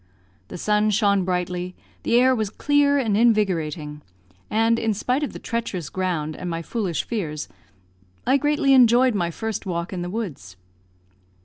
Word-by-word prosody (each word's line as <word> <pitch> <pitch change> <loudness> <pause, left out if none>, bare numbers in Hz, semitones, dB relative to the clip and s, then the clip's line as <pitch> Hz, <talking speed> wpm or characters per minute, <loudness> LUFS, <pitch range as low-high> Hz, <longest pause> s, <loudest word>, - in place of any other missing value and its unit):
The - - -8
sun 210 +3 +2
shone 200 -2 +2
brightly, 180 0 -2 0.3
the - - 0
air 260 +1 +5
was 220 -4 -1
clear 285 +5 +2
and 225 -7 +1
invigorating, 170 -10 +1 0.5
and, 225 +1 +2
in 220 -2 0
spite 250 +7 0
of 295 - -2
the - - -8
treacherous 200 -9 -4
ground 170 -5 -2
and 180 - -5
my 165 0 -3
foolish 190 -1 -2
fears, 160 -10 -4 0.8
I 265 +2 +4
greatly 290 -1 +2
enjoyed 250 0 +5
my 175 -4 0
first 220 +3 -4
walk 170 +1 -3
in 180 - -3
the 175 - -4
woods. 165 - -6
205 Hz, 155 wpm, -23 LUFS, 175-235 Hz, 0.8 s, air